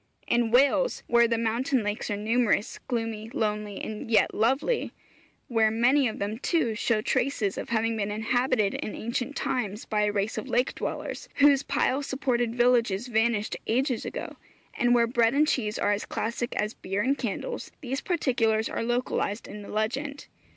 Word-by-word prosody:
In 235 -1 +2
Wales, 280 - +3
where 235 0 +4
the 230 0 0
mountain 230 +2 0
lakes 205 +1 -3
are 205 - -1
numerous, 225 0 +1
gloomy, 225 -2 -3
lonely, 210 -2 -2
and 215 +1 -6
yet 225 - +3
lovely; 270 - +1 0.5
where 225 -2 +3
many 245 +5 +3
of 220 - -4
them, 210 +3 -3
too, 275 -7 +1
show 215 0 +1
traces 220 -4 0
of - - -6
having 225 0 +1
been 210 -2 -2
inhabited 220 0 +1
in 215 - -4
ancient 245 +5 -3
times 220 -5 -2
by 210 -1 0
a 210 - +1
race 205 +2 -1
of - - -7
lake 245 +2 +1
dwellers, - - -5
whose 280 -1 +5
pile 275 -1 0
supported 245 -4 -1
villages 240 -4 +2
vanished 220 -2 +1
ages 255 +1 +1
ago; - - -6 0.4
and 245 0 +3
where 235 -1 +4
bread 235 +1 +2
and 305 +2 +4
cheese 215 -8 0
are 205 - +1
as 205 0 -1
classic 235 +2 -3
as 210 +1 -1
beer 195 +2 -2
and 275 +2 +1
candles, 255 - -4
these 270 -1 -3
particulars 230 -10 +1
are - - -3
localized 240 -3 -1
in 210 - -8
the 200 - -10
legend. 270 +7 -2
230 Hz, 170 wpm, -27 LUFS, 215-255 Hz, 0.5 s, whose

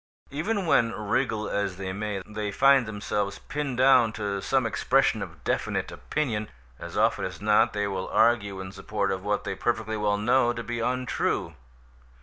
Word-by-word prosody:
Even 190 +7 -1
when, 115 -7 +3
wriggle 105 +1 -1
as 100 -3 -2
they 95 -1 -4
may, 100 -1 -3
they 105 -1 -4
find 135 +1 +4
themselves 105 -1 -2
pinned 140 -3 -4
down 130 -3 +5
to 100 -2 -3
some 130 +2 +1
expression 115 +1 +2
of 85 -6 -8
definite - - -1
opinion, 110 -9 -2 0.3
as - - -7
often - - +2
as - - -5
not 105 +1 +3
they 105 0 0
will 95 -2 -3
argue 105 -4 +2
in 95 0 -6
support 100 +1 -2
of 95 -1 -3
what 105 0 -1
they - - -3
perfectly 110 +1 -1
well 105 -1 +1
know 120 +3 +3
to 115 0 -5
be 120 0 -4
untrue. 125 -8 -1
105 Hz, 170 wpm, -26 LUFS, 100-120 Hz, 0.3 s, down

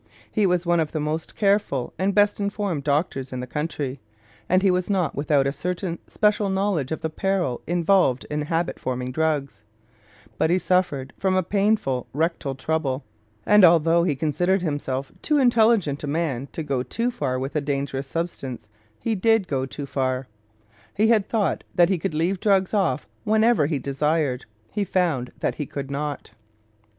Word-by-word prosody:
He 210 -2 +2
was 180 -1 +1
one 170 0 +3
of 155 -2 -1
the 155 - -1
most 155 +2 -3
careful 200 - +1
and 190 +1 +1
best 205 0 +3
informed 200 -6 -2
doctors 140 -2 -1
in 130 - -4
the 125 - -4
country, 145 -1 -3 0.5
and 185 +2 +3
he 195 - +5
was 180 +1 0
not 190 -4 +1
without 145 -1 +2
a 140 - +1
certain 175 +3 -3
special 210 -1 +1
knowledge 190 -8 0
of 160 - -3
the 160 - -1
peril 180 -7 -1
involved 175 -5 +2
in 150 0 -1
habit 165 +3 -1
forming 125 0 -3
drugs; 140 -7 -1 0.8
but 160 - +3
he 175 - +4
suffered 180 -8 0
from 190 -1 +1
a 185 - +2
painful 195 - +1
rectal 155 -2 -1
trouble, 135 -1 -1 0.4
and 210 -1 +6
although 170 0 +5
he 160 -5 +1
considered 175 +6 +1
himself 140 -4 -2
too 300 - +2
intelligent 225 - +3
a - - -3
man 145 -4 -1
to 160 - -4
go 135 -4 -1
too 230 - -2
far 130 - -2
with 135 +3 -4
a 150 - +2
dangerous 140 -1 -2
substance, 135 -7 -4 0.3
he 230 - -1
did 220 0 +2
go 135 -3 -1
too 145 +1 -6
far. 130 -1 -2 0.7
He 220 +2 +3
had 215 -4 +3
thought 215 -4 0
that 175 -1 +5
he 190 -3 +1
could 155 - -3
leave 175 +4 0
drugs 195 -1 +2
off 180 -10 +1 0.2
whenever 220 -6 +3
he 155 -2 0
desired; 140 0 0 0.3
he 205 - -1
found 170 -11 0
that - - 0
he 145 - -3
could 140 -1 -6
not. 145 0 -4
160 Hz, 175 wpm, -24 LUFS, 140-190 Hz, 0.8 s, and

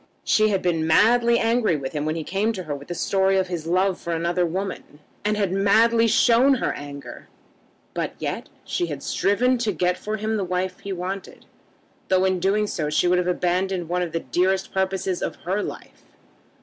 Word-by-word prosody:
She 215 0 +3
had 195 -3 0
been 165 -3 0
madly 235 +7 +4
angry 230 -6 +2
with 135 -2 -5
him 150 -1 -2
when 155 +1 -1
he 165 - -3
came 200 +7 0
to 185 -3 -5
her 155 -3 -4
with 140 0 -8
the 175 - -5
story 195 +2 +2
of 185 -1 0
his 165 -3 -4
love 185 +2 +1
for 170 - -3
another 170 +2 0
woman, 185 -3 -5 0.3
and 210 +1 0
had 200 -3 0
madly 225 +4 +4
shown 240 +4 +4
her 245 - -1
anger; 145 0 -9 0.7
but - - -3
yet - - -4 0.2
she 175 - -1
had 145 -3 -6
striven 245 +7 +1
to 225 -3 0
get 180 0 0
for 215 +1 -3
him 220 +1 -1
the 200 - -1
wife 185 0 -2
he 200 - -7
wanted, 185 +1 -5 0.6
though 185 0 +3
in 185 -1 +1
doing 200 +4 +1
so 155 -7 -2
she 155 +4 +2
would 180 0 +3
have 180 - -1
abandoned 180 0 0
one 180 +1 0
of 175 -2 -2
the 165 - -2
dearest 190 +2 0
purposes 190 -1 -1
of - - -3
her 190 +4 0
life. - - -8
185 Hz, 200 wpm, -23 LUFS, 175-210 Hz, 0.7 s, madly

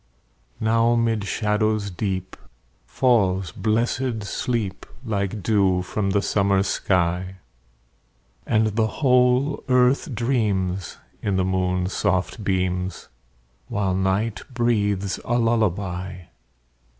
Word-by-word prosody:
Now 115 +2 +3
'mid 115 -3 +1
shadows 105 0 0
deep 95 0 -3 0.5
Falls 95 -8 +2
blessed 115 +2 -1
sleep, 105 -2 -3 0.2
Like 100 -2 -2
dew 95 -4 +2
from 100 +2 -2
the 100 0 +1
summer 100 -1 +2
sky; 90 -1 0 1.1
And 110 -1 +2
the 110 -1 +2
whole 125 +2 +2
earth 125 +3 +3
dreams, 100 -7 -1 0.2
In 100 - 0
the 95 -1 +1
moon's 90 0 0
soft 95 +2 -1
beams, 95 -1 -2 0.6
While 100 -5 -1
night 95 +4 0
breathes 105 -5 0
a 120 - 0
lullaby. 95 -5 0
100 Hz, 100 wpm, -23 LUFS, 95-115 Hz, 1.1 s, Now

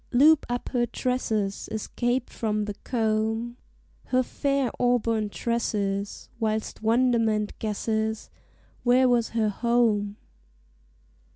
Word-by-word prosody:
Loop 290 +5 +5
up 245 0 -3
her 240 -1 +1
tresses 220 -5 -2
Escaped 240 +3 -1
from 215 -2 -1
the 205 - -4
comb, 225 0 -1 0.5
Her 255 0 +2
fair 275 0 0
auburn 230 -3 +1
tresses, 205 -3 -2
Whilst 220 -1 -2
wonderment 225 -2 +2
guesses 220 0 -2 0.5
Where 255 +1 +4
was 240 -2 +2
her 215 -2 +3
home? 215 -2 +1
225 Hz, 100 wpm, -26 LUFS, 215-245 Hz, 0.5 s, Loop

